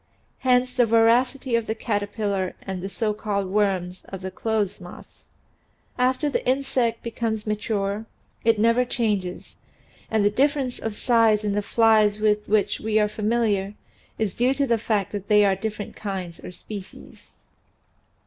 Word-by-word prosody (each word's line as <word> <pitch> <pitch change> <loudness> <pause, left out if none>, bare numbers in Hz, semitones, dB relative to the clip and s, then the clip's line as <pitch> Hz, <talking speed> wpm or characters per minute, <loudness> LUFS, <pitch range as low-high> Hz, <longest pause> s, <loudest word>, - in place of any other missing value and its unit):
Hence 250 -1 +2
the 245 -2 +3
voracity 235 +3 +3
of 230 -1 0
the 220 - -1
caterpillar 205 -3 -2
and 190 -2 -5
the 195 - -4
so 215 +1 -1
called 205 -2 -2
" - - -8
worms" 185 -3 0
of 190 -1 -8
clothes 210 -2 -1
moths. 175 0 -13 0.7
After 260 +4 +1
the 285 - -1
insect 255 -3 0
becomes 225 -2 -3
mature 210 0 -2 0.4
it 230 -1 +3
never 230 +3 +3
changes, 210 -7 -2 0.5
and 220 -2 +2
the 205 - +4
difference 270 +1 +1
of 225 -2 -4
size 225 -3 +3
in 205 -1 0
the 205 - +1
flies 215 -1 +3
with 210 -1 +1
which 210 -1 +2
we 220 0 0
are 210 -1 +4
familiar 210 -2 0 0.4
is 215 -4 -1
due 255 +3 +2
to 280 - +1
the 235 -3 +1
fact 210 -3 -1
that 200 -1 -5
they 210 -1 +5
are 195 -1 +3
different 210 +1 -5
kinds 190 -5 -5
or - - -7
species. 195 +2 -10
215 Hz, 160 wpm, -24 LUFS, 205-230 Hz, 0.7 s, they